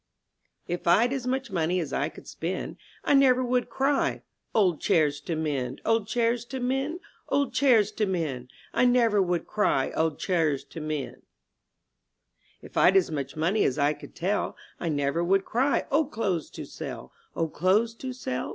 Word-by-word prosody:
TF 175 0 -3
Vd 215 +9 +4
as 265 -2 -3
much 260 -2 -2
money 175 0 +1
as 155 -5 -4
I 145 +3 0
could - - -14
spend, 175 +3 -4
■*• - - -39 0.2
I - - +2
never 260 -2 +5
would 250 0 0
cry^, 270 +1 0 0.3
01d 185 -8 +3
chairs 150 -3 +2
to 165 +2 -3
mend, 140 -5 -2
Old 225 -2 +2
chairs 235 0 +1
to 265 +2 -5
mend, 270 +7 -1 0.3
old 280 -1 +1
chairs 230 -7 +4
to 210 0 -1
mend!'* 150 -9 -3 0.2
I - - +3
never 235 -4 +4
would 175 -2 0
cry, 210 -10 +1
*'01d 160 -2 0
chairs 160 -7 0
to 165 - -9
mend 155 -3 -4 0.7
!" - - -41
If - - -12
Vd 185 - +5
as 185 -4 +3
much 140 -3 -4
money 175 +7 +1
as 130 - +1
I 145 0 +3
could - - -13
tell, 195 +4 -1 0.2
I 170 - -2
never 145 +2 0
would 195 +2 +2
cry, 265 +5 +1
*'01d 295 +1 +2
clothes 190 - -1
to - - -8
sell. - - -8
190 Hz, 170 wpm, -27 LUFS, 155-245 Hz, 0.7 s, never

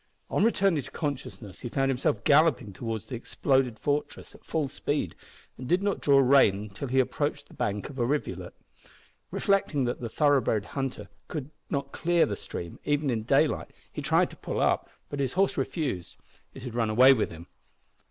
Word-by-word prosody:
On - - +2
returning 195 -8 +3
to - - -10
consciousness 130 - -5
he 120 - -5
found 135 +2 +1
himself 125 -4 0
galloping 145 -8 +4
towards 110 +1 -4
the - - -9
exploded 130 0 0
fortress 145 +4 -2
at - - -17
full 155 -3 -1
speed, 135 - -2 0.5
and 130 0 -6
did 180 +2 +3
not 200 -1 0
draw 140 -1 +5
rein 115 -7 +4
till 135 +8 -5
he 130 +1 +2
approached 145 +2 -1
the - - -17
bank 105 0 -2
of 140 - -11
the 120 -2 +1
rivulet. 145 +2 -3 0.7
Reflecting 195 -9 +1
that 120 0 -3
a 115 - -3
thoroughbred 135 -7 +2
hunter 135 -2 -4 0.2
could 150 -3 -5 0.2
not 140 -1 -2
clear 170 0 +2
the 100 - -3
stream, 85 -3 -7
even 145 -1 +1
in 115 -2 -1
daylight, 110 - +2 0.2
he - - -4
tried - - +2
to - - -11
pull - - -4
up, - - +1 0.2
but 145 - -5
his 135 -2 0
horse 195 +2 +2
refused. 130 - -3 0.4
It - - -9
had 125 -3 -6
run 115 -2 0
away 130 +5 +7
with 110 - 0
him. 85 0 -10
135 Hz, 185 wpm, -28 LUFS, 115-145 Hz, 0.7 s, away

